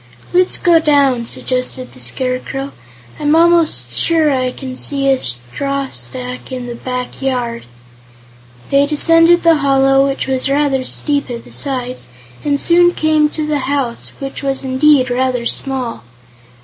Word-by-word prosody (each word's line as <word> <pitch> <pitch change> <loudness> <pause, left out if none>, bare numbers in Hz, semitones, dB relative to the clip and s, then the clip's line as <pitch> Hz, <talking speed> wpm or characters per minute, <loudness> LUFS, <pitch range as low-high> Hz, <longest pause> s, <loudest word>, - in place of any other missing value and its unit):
"Let's 365 0 +3
go 340 -2 +4
down," 280 -6 +2
suggested 255 +1 -3
the 125 - -15
Scarecrow. 255 - -3 0.5
"I'm 295 +1 +2
almost 335 -1 +2
sure 320 -3 +1
I 255 -2 -1
can 260 0 -8
see 275 +1 0
a 270 -1 +3
straw 265 - -3
stack 125 +1 -6
in 255 -1 -5
the 240 - -6
back 250 +2 -6
yard." 245 - -3 1.0
They 280 +1 +3
descended 330 +3 +6
the 330 -1 +4
hollow, 270 -1 +3
which 275 0 -3
was 265 0 -2
rather 275 -2 0
steep 285 0 -1
at 235 -1 -6
the - - -15
sides, 255 - -4 0.4
and 285 -1 0
soon 350 +2 +3
came 310 -1 +2
to 310 0 -4
the 300 -1 -1
house, 270 -5 -3
which 275 -1 -6
was 270 -1 -2
indeed 260 0 +3
rather 250 -1 -1
small. 255 - -2
270 Hz, 150 wpm, -15 LUFS, 255-295 Hz, 1.0 s, descended